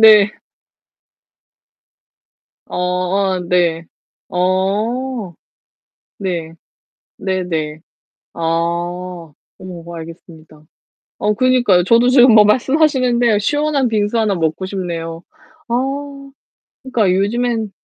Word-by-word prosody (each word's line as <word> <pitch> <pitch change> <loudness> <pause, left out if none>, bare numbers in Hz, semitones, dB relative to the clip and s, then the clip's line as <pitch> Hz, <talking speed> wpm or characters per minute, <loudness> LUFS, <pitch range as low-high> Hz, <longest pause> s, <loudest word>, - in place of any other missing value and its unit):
네. 215 -2 +7 2.4
어 - - -6
어 185 +1 0
네. 170 -2 0 0.4
어. 200 +4 -1 0.9
네. 175 -5 -3 0.7
네 190 -1 -2
네. 155 -3 -3 0.5
아. - - -10 1.2
어 170 -2 -9
알겠습니다. 160 -2 -12 0.6
어 210 - +1
그니까요. 245 -7 +3
저도 235 +5 +4
지금 250 -2 +6
뭐 210 -1 +8
말씀하시는데 250 -1 +2
시원한 290 +3 0
빙수 215 0 0
하나 215 -3 +1
먹고 165 +1 -2
싶네요. 170 -4 -5 0.5
아 235 - -1 1.1
그러니까 235 -8 +1
요즘엔 225 +2 0
195 Hz, 170 characters per minute, -17 LUFS, 175-235 Hz, 2.4 s, 뭐